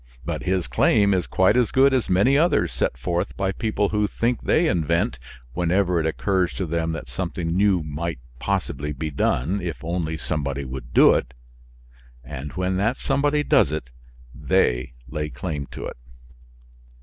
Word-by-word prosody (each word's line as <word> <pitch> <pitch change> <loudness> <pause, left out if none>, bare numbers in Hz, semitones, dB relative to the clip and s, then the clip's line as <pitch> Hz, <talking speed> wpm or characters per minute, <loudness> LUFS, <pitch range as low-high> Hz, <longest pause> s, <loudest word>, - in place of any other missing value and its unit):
But - - -3
his 95 -2 0
claim 100 - +3
is 90 -2 0
quite 95 +4 +3
as 125 -3 +3
good 135 +1 +4
as 130 -3 0
many 100 +9 +4
others 165 +5 +2
set - - -1
forth 85 0 -2
by 95 0 0
people 105 -1 -1
who 105 -1 +1
think 120 +3 -1
they 165 - +2
invent, 85 - 0 0.3
whenever 90 +1 +1
it 80 - 0
occurs 95 +2 0
to 95 - -2
them 80 0 -1
that 80 - -6
something 85 -1 -3
new 95 -3 +3
might 75 +1 -4 0.2
possibly 75 +2 -2
be 75 +3 -4
done, 80 +7 0
if 85 -3 -5
only 80 -1 -2
somebody 70 -3 -3
would 65 -2 -7
do - - +7
it. - - -2 0.9
And 70 +1 -7
when 95 0 -1
that 110 +6 +1
somebody 145 +1 +1
does 140 - +4
do 75 - -2
it 65 -6 -6 0.4
they 60 0 +1
lay 75 +2 -3
claim 75 -4 -5
to - - -7
it. - - -7
85 Hz, 170 wpm, -23 LUFS, 75-100 Hz, 0.9 s, do